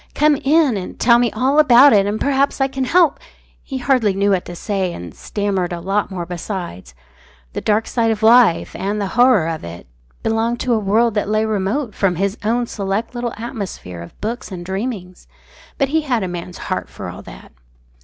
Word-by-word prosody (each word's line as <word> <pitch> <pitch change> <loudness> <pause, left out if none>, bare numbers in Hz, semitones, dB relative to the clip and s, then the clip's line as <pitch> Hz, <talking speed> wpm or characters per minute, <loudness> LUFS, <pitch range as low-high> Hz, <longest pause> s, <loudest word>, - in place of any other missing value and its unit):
Come 300 0 +4
in, 285 -3 +2
and 185 - -7
tell 235 0 +5
me 240 -1 +1
all 270 +4 +2
about 275 -1 +7
it 200 -1 +4
and 210 +1 -2
perhaps 280 0 +1
I 270 - +3
can 265 -1 -3
help 340 +3 +3 0.2
" - - -34
He 270 - -5
hardly 245 -6 +1
knew 200 +1 +2
what 185 -2 +1
to 175 - -8
say, 190 -1 -2
and 85 -2 -8
stammered 195 -4 -2
a 175 - -4
lot 195 +4 -1
more 180 -3 -5
besides. 175 - -6 0.6
The - - -4
dark 215 +1 +1
side 230 -2 0
of 220 -1 -1
life, 225 -6 +5
and 205 +2 -2
the 200 -2 -2
horror 240 -8 +4
of 160 -2 -4
it, 85 +1 -9 0.4
belonged 225 +2 0
to 250 - +1
a 225 - +2
world 220 +3 +2
that 205 -1 -1
lay 215 +1 +1
remote 215 +4 -1
from 190 -3 +1
his 195 +3 -1
own 235 +3 +1
select 205 +2 -3
little 240 -1 -3
atmosphere 200 - -6
of 85 - -12
books 225 +1 -4
and 175 -2 -7
dreamings. 190 -2 -5 0.5
But 275 -2 +1
he 320 +2 +1
had 250 -8 -1
a - - -2
man's 175 0 -6
heart - - -4
for - - -8
all - - -8
that. - - -13
215 Hz, 205 wpm, -19 LUFS, 190-245 Hz, 0.6 s, about